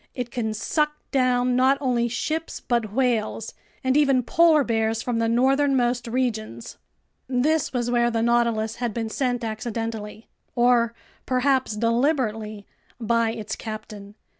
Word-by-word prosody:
It 245 Hz, -2 st, -4 dB
can 220 Hz, -3 st, -2 dB
suck 300 Hz, +7 st, 0 dB, 0.2 s
down 250 Hz, -1 st, +2 dB
not 260 Hz, +2 st, +4 dB
only 245 Hz, -3 st, +1 dB
ships 315 Hz, +8 st, -3 dB
but 235 Hz, -4 st, -1 dB
whales, 225 Hz, -2 st, -1 dB, 0.3 s
and 260 Hz, 0 st, +1 dB
even 275 Hz, -4 st, +3 dB
polar 320 Hz, +3 st, +4 dB
bears 225 Hz, -2 st, 0 dB
from 240 Hz, -2 st, -1 dB
the 225 Hz, 0 st, +1 dB
northernmost 255 Hz, -1 st, +2 dB
regions. 225 Hz, -, -3 dB, 0.5 s
This 270 Hz, +4 st, +1 dB
was 245 Hz, -2 st, -1 dB
where 240 Hz, 0 st, +3 dB
the 225 Hz, -1 st, 0 dB
Nautilus 235 Hz, -2 st, +1 dB
had 240 Hz, -4 st, -3 dB
been 225 Hz, -1 st, -2 dB
sent 245 Hz, 0 st, -1 dB
accidentally—or 230 Hz, +1 st, -2 dB, 0.3 s
perhaps 260 Hz, -3 st, +1 dB
deliberately—by 230 Hz, -2 st, -1 dB
its 220 Hz, -2 st, -5 dB
captain. 210 Hz, -2 st, -8 dB
240 Hz, 125 wpm, -24 LUFS, 225-255 Hz, 0.5 s, not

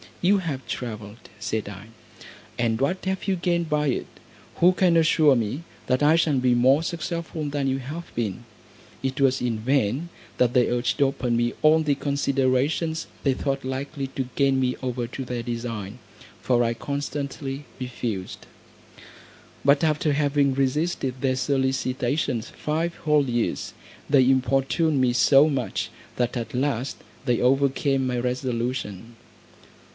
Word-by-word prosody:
"You 195 Hz, +3 st, +4 dB
have 140 Hz, -8 st, -4 dB
travelled," 110 Hz, -2 st, -6 dB
said 110 Hz, 0 st, -2 dB
I, 100 Hz, +1 st, -10 dB, 0.7 s
"and 115 Hz, -2 st, 0 dB
what 180 Hz, +8 st, 0 dB
have 190 Hz, +1 st, -2 dB
you 195 Hz, -, +2 dB
gained 170 Hz, -2 st, 0 dB
by 150 Hz, -1 st, +1 dB
it? 130 Hz, -, -1 dB, 0.5 s
Who 175 Hz, +2 st, +5 dB
can 180 Hz, -2 st, +3 dB
assure 155 Hz, -3 st, +5 dB
me, 120 Hz, +7 st, -2 dB, 0.2 s
that 130 Hz, +2 st, +1 dB
I 150 Hz, +2 st, +5 dB
shall 160 Hz, -4 st, +2 dB
be 125 Hz, -1 st, +3 dB
more 130 Hz, +5 st, +4 dB
successful 170 Hz, -2 st, -4 dB
than 145 Hz, -1 st, -1 dB
you 135 Hz, 0 st, +1 dB
have 155 Hz, +6 st, -7 dB
been?" 115 Hz, -1 st, -2 dB, 0.6 s
It 135 Hz, +2 st, -2 dB
was 135 Hz, -1 st, +3 dB
in 120 Hz, -3 st, -1 dB
vain 130 Hz, +5 st, 0 dB, 0.3 s
that 125 Hz, -1 st, +3 dB
they 125 Hz, -2 st, +3 dB
urged 125 Hz, +4 st, +1 dB
open 130 Hz, -3 st, 0 dB
me 120 Hz, 0 st, +1 dB
all 155 Hz, +1 st, +5 dB
the 150 Hz, -2 st, +2 dB
considerations 140 Hz, +3 st, 0 dB, 0.2 s
they 135 Hz, -, +3 dB
thought 135 Hz, +1 st, -2 dB
likely 135 Hz, +1 st, -3 dB
to 130 Hz, -2 st, -2 dB
gain 135 Hz, -1 st, +3 dB
me 125 Hz, -1 st, +1 dB
over 125 Hz, -2 st, -2 dB
to 130 Hz, +2 st, -6 dB
their 120 Hz, -1 st, -4 dB
design, 115 Hz, -2 st, -5 dB, 0.4 s
for 120 Hz, -1 st, +2 dB
I 115 Hz, 0 st, +1 dB
constantly 140 Hz, +1 st, -4 dB
refused; 120 Hz, -6 st, -5 dB, 1.2 s
but 140 Hz, +2 st, +4 dB
after 155 Hz, -1 st, +2 dB
having 140 Hz, -2 st, +2 dB
resisted 135 Hz, -1 st, -1 dB
their 130 Hz, -1 st, +1 dB
solicitations 130 Hz, -1 st, 0 dB
five 165 Hz, +2 st, -2 dB
whole 150 Hz, -2 st, +3 dB
years, 120 Hz, -2 st, -1 dB, 0.4 s
they 135 Hz, -3 st, +5 dB
importuned 135 Hz, +3 st, +2 dB
me 125 Hz, -1 st, +3 dB
so 135 Hz, +4 st, +6 dB
much, 135 Hz, -6 st, -2 dB, 0.3 s
that 125 Hz, 0 st, -1 dB
at 115 Hz, 0 st, -5 dB
last 130 Hz, -1 st, -1 dB, 0.3 s
they 120 Hz, -3 st, +2 dB
overcame 135 Hz, +1 st, +2 dB
my 125 Hz, -1 st, -1 dB
resolution. 120 Hz, -3 st, -3 dB
135 Hz, 145 wpm, -25 LUFS, 125-145 Hz, 1.2 s, so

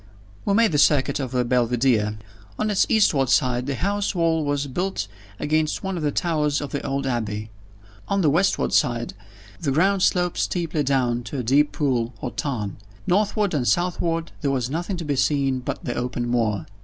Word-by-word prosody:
We 200 Hz, -, +2 dB
made 225 Hz, -2 st, +4 dB
the 145 Hz, -, +1 dB
circuit 140 Hz, -1 st, +3 dB
of 130 Hz, -3 st, -3 dB
the 125 Hz, -1 st, 0 dB
Belvidere. 120 Hz, -3 st, +1 dB, 0.4 s
On 215 Hz, 0 st, 0 dB
its 195 Hz, -, +3 dB
eastward 155 Hz, -, +3 dB
side 125 Hz, -1 st, +2 dB
the 140 Hz, -, -1 dB
house 200 Hz, +5 st, -1 dB
wall 165 Hz, -2 st, +2 dB
was 145 Hz, -1 st, -1 dB
built 160 Hz, -, -2 dB, 0.3 s
against 155 Hz, +3 st, 0 dB
one 190 Hz, -1 st, -2 dB
of 170 Hz, -, -3 dB
the 150 Hz, -1 st, 0 dB
towers 150 Hz, -4 st, 0 dB
of 145 Hz, -, -5 dB
the 140 Hz, -, -3 dB
old 140 Hz, 0 st, -2 dB
Abbey. 110 Hz, -4 st, -3 dB, 0.6 s
On 200 Hz, 0 st, +1 dB
the 155 Hz, -, +4 dB
westward 180 Hz, +6 st, +1 dB
side, 120 Hz, -3 st, +1 dB, 0.5 s
the 155 Hz, -, -2 dB
ground 190 Hz, +8 st, +2 dB
sloped 180 Hz, -1 st, +2 dB
steeply 165 Hz, -4 st, -1 dB
down 130 Hz, -4 st, +1 dB
to 120 Hz, -, -5 dB
a 125 Hz, -, -2 dB
deep 140 Hz, +5 st, +3 dB
pool 125 Hz, -6 st, -1 dB
or 125 Hz, -, -4 dB
tarn. 115 Hz, -9 st, -3 dB, 0.3 s
Northward 205 Hz, 0 st, +1 dB
and 130 Hz, -5 st, 0 dB
southward, 170 Hz, -2 st, 0 dB
there 140 Hz, -, 0 dB
was 130 Hz, -2 st, -1 dB
nothing 175 Hz, +4 st, -2 dB
to 170 Hz, -, -5 dB
be 145 Hz, -1 st, 0 dB
seen 135 Hz, -1 st, +1 dB
but 140 Hz, +6 st, -5 dB
the 120 Hz, -, -2 dB
open 120 Hz, 0 st, -2 dB
moor. 115 Hz, -4 st, 0 dB
140 Hz, 190 wpm, -23 LUFS, 125-170 Hz, 0.6 s, made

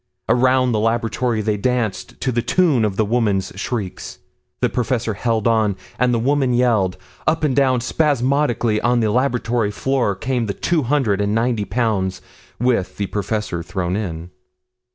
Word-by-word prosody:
Around 130 Hz, +1 st, +3 dB
the 110 Hz, -, +1 dB
laboratory 115 Hz, +1 st, 0 dB
they 105 Hz, 0 st, 0 dB
danced 120 Hz, -2 st, -2 dB
to 130 Hz, -, 0 dB
the 120 Hz, 0 st, 0 dB
tune 140 Hz, -3 st, +2 dB
of 100 Hz, -2 st, -2 dB
the 110 Hz, -, +1 dB
woman's 105 Hz, -4 st, 0 dB
shrieks. 105 Hz, -2 st, -4 dB, 0.4 s
The -, -, +2 dB
professor 120 Hz, -2 st, -1 dB
held 115 Hz, +1 st, 0 dB
on, 110 Hz, -3 st, +2 dB, 0.2 s
and 125 Hz, 0 st, +3 dB
the 120 Hz, -, +2 dB
woman 130 Hz, +1 st, +1 dB
yelled. 110 Hz, -7 st, +2 dB, 0.3 s
Up 160 Hz, +1 st, +1 dB
and 140 Hz, -4 st, +1 dB
down 130 Hz, -3 st, +3 dB
spasmodically 130 Hz, -5 st, +1 dB
on 120 Hz, 0 st, +2 dB
the 110 Hz, -2 st, +1 dB
laboratory 120 Hz, -3 st, +1 dB
floor 125 Hz, -1 st, 0 dB
came 120 Hz, +3 st, -2 dB
the 100 Hz, -, -3 dB
two 170 Hz, -2 st, 0 dB
hundred 125 Hz, -7 st, +1 dB
and 100 Hz, +1 st, 0 dB
ninety 115 Hz, -2 st, 0 dB
pounds 100 Hz, -4 st, -1 dB, 0.4 s
with 120 Hz, -6 st, 0 dB
the 100 Hz, -, -1 dB
professor 105 Hz, -3 st, -3 dB
thrown 90 Hz, +1 st, -3 dB
in. 90 Hz, -4 st, -4 dB
115 Hz, 160 wpm, -20 LUFS, 105-125 Hz, 0.4 s, Around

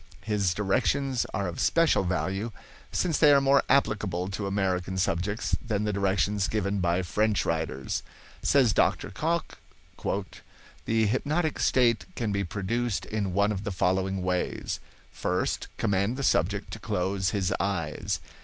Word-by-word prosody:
His 100 Hz, -4 st, 0 dB
directions 125 Hz, +6 st, +1 dB
of -, -, -11 dB
are 90 Hz, -4 st, -2 dB
special 165 Hz, -10 st, +3 dB
value, 95 Hz, +4 st, -1 dB, 0.4 s
since 170 Hz, -4 st, 0 dB
they 150 Hz, -2 st, +7 dB
are 140 Hz, -, +7 dB
more 135 Hz, 0 st, +4 dB
applicable 105 Hz, -9 st, +1 dB
to 100 Hz, +1 st, -3 dB
American 95 Hz, -2 st, -1 dB
subjects 95 Hz, +3 st, 0 dB
than 105 Hz, -3 st, -1 dB
the 105 Hz, -1 st, 0 dB
directions 100 Hz, 0 st, +1 dB
given 100 Hz, -2 st, -1 dB
by 90 Hz, 0 st, +1 dB
French 105 Hz, +1 st, +1 dB
writers. 80 Hz, -5 st, -2 dB, 0.4 s
Says 130 Hz, -7 st, +4 dB
Dr. -, -, +1 dB
Cocke: 170 Hz, +2 st, -1 dB, 1.3 s
"The 110 Hz, 0 st, +2 dB
hypnotic 150 Hz, +8 st, 0 dB
state 115 Hz, -6 st, +3 dB
can 115 Hz, -3 st, -1 dB
be 100 Hz, 0 st, 0 dB
produced 105 Hz, +4 st, -2 dB
in 100 Hz, -4 st, -2 dB
one 100 Hz, +2 st, +3 dB
of 100 Hz, -1 st, -3 dB
the 105 Hz, -, -2 dB
following 95 Hz, +1 st, 0 dB
ways: 90 Hz, 0 st, -2 dB, 0.3 s
First, -, -, -1 dB
command 100 Hz, +5 st, +1 dB
the 140 Hz, -, -3 dB
subject -, -, +1 dB
to -, -, -6 dB
close 95 Hz, +1 st, -1 dB
his 100 Hz, -3 st, 0 dB
eyes. 85 Hz, -7 st, -1 dB
100 Hz, 145 wpm, -27 LUFS, 95-115 Hz, 1.3 s, they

